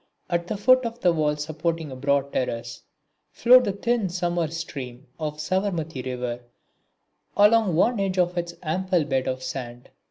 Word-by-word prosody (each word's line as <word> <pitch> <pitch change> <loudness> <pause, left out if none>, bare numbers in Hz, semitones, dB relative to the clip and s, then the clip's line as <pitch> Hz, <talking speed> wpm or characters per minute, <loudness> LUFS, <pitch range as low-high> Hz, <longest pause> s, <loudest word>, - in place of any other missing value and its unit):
At 170 0 0
the 210 - -3
foot 255 +5 +5
of 230 0 -5
the 175 -2 +4
wall 150 -2 +1
supporting 155 +1 -3
a - - -6
broad 140 +1 0
terrace 120 -2 -3 0.5
flowed 250 +2 +6
the - - 0
thin 220 0 0
summer 175 -1 -1
stream 140 -6 -7
of 150 -1 -3
the 150 - -7
Savarmati 165 -6 -2
river 125 -2 -3 1.0
along 210 -3 +5
one 230 +6 +3
edge 195 -1 -1
of 180 -1 +2
its 170 -1 -3
ample 180 +1 0
bed 135 -3 -1
of 130 0 -3
sand. 125 -2 -6
165 Hz, 165 wpm, -25 LUFS, 140-190 Hz, 1.0 s, flowed